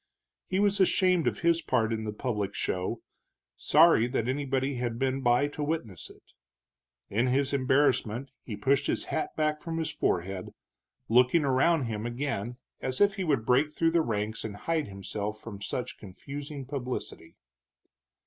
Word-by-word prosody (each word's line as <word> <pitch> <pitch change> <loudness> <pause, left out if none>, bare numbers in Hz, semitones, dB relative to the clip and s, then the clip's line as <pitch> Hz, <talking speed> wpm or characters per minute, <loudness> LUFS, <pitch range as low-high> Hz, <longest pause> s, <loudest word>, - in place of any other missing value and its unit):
He 185 - -1
was 200 0 +2
ashamed 185 -2 +3
of - - -1
his 170 0 +3
part 115 -7 +1
in 110 -1 -3
the 105 - -2
public 105 -3 -3
show, 95 +5 -2 0.5
sorry 155 -7 +5
that 120 -2 -1
anybody 135 0 0
had 120 -2 -2
been 135 +1 0
by 120 +3 +3
to 150 +1 -5
witness 145 - -3
it. - - -17 0.9
In 115 +5 +2
his 135 +2 +1
embarrassment 130 -2 +2
he 110 - -6
pushed 135 +7 +2
his - - -1
hat 160 - 0
back 155 -1 0
from 165 -1 -4
his 160 -2 -1
forehead, 90 +1 -2 0.5
looking 125 +7 +4
around 140 +4 +3
him 115 -1 -3
again 120 -2 -3 0.2
as 130 0 -2
if 205 -1 +5
he 195 -2 -3
would 140 -10 +1
break 135 +5 +3
through 165 +1 +1
the 170 0 +3
ranks 110 -4 -2
and 105 -2 -5
hide 160 +8 -1
himself 100 +2 -5
from 105 -3 -9
such 125 +4 -4
confusing 140 +8 -8
publicity. 125 - -5
130 Hz, 160 wpm, -29 LUFS, 110-150 Hz, 0.9 s, sorry